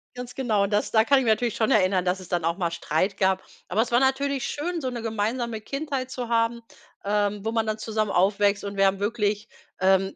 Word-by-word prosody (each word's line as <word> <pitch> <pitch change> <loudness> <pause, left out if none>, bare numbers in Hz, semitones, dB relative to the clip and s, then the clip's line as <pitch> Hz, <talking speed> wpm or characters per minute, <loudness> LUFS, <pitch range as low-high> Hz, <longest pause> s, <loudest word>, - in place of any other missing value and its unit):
Ganz 250 0 -7
genau, 220 -6 +1
und 200 - -2
das 205 - +1
da 220 -1 +5
kann 275 +3 +4
ich 260 - -1
mich 225 - +4
natürlich 230 +1 0
schon 220 - +1
erinnern, 185 -2 +3
dass 180 +1 0
es 185 - -11
dann 175 -3 -1
auch 170 +2 0
mal 170 -3 -1
Streit 170 +4 -1
gab, 190 -1 +1 0.2
aber 210 +5 +1
es 235 - -2
war 240 - +5
natürlich 270 0 +1
schön, 335 +3 -3
so 260 - -2
'ne 240 -2 -5
gemeinsame 225 +1 -2
Kindheit 275 -1 -4
zu 250 -2 -5
haben, 230 0 +1 0.4
ähm, 205 0 0
wo 225 - 0
man 225 -1 0
dann 215 0 -1
zusammen 215 -1 -2
aufwächst 200 +2 +2
und 200 0 -5
wir 195 - +4
haben 195 0 0
wirklich, 210 0 -1 0.3
ähm, 190 +1 +2
215 Hz, 235 wpm, -25 LUFS, 195-240 Hz, 0.4 s, da